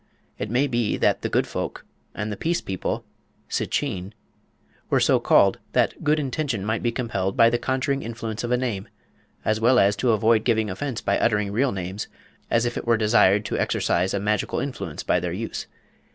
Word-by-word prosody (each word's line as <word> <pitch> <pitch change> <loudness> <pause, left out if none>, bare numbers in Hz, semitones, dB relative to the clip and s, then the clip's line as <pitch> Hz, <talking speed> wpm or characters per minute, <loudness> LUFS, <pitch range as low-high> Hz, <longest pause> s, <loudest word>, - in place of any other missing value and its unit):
It 100 - -3
may 125 +5 +2
be 120 -5 0
that - - +2
"the - - -2
good - - +2
folk" - - -5 0.3
and 105 +1 -3
the - - -3
"peace 170 - 0
people" 95 -2 -3 0.4
(sitchean) 95 +3 -2 0.8
were - - +3
so - - +4
called - - +4
that - - +1
good 155 0 +3
intention 135 -7 -2
might 110 +2 -1
be 120 - +1
compelled 110 -4 -2
by 115 -1 +6
the 120 - +1
conjuring 135 +3 -1
influence 115 -1 -5
of 120 - -2
a 125 - +2
name, 115 -6 -3 0.6
as 110 0 +1
well 125 +3 +5
as 100 -2 +4
to 125 - +1
avoid 110 +1 +3
giving 110 -4 +1
offence 130 +4 -4
by - - +1
uttering 105 -3 +1
real 125 +5 +1
names, 95 +1 -4 0.4
as 115 +1 +2
if 120 - -2
it - - -5
were 115 -1 +4
desired 105 -2 +4
to - - -2
exercise 90 +3 +1
a - - 0
magical 105 +1 0
influence 135 -5 -5
by 90 - +2
their 85 -1 -3
use. 110 +5 -5
115 Hz, 195 wpm, -24 LUFS, 100-125 Hz, 0.8 s, by